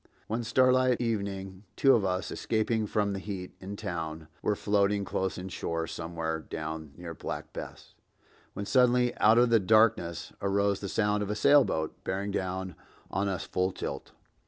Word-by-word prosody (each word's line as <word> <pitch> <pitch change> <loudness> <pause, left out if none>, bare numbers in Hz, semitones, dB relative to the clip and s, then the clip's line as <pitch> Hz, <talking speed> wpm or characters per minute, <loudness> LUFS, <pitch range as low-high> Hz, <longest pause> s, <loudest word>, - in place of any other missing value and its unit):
One 115 +2 -2
starlight 130 +1 +3
evening 100 -5 -3
two 135 -1 +5
of 110 - +3
us, 95 0 -1
escaping 110 -1 0
from 105 -1 0
the 100 - -3
heat 95 -2 -6
in 100 +2 -6
town, 80 -6 -5
were 105 - +1
floating 100 0 +1
close 95 -1 -2
inshore 85 -3 -3
somewhere 80 -1 -3
down 80 -1 -6
near 85 -1 -7
Black - - -6
Bess, - - -8 0.6
when 100 - -4
suddenly 125 0 +3
out 110 +2 +6
of 120 0 +5
the 115 - +6
darkness 100 -5 +2
arose 100 0 +1
the 100 - -5
sound 105 0 +1
of 105 - -2
a 105 - -1
sailboat 105 - +3
bearing 100 +2 -2
down 95 -1 -3 0.4
on 100 +2 0
us 95 -3 -2
full 90 +1 0
tilt. - - -6
100 Hz, 160 wpm, -29 LUFS, 90-110 Hz, 0.6 s, out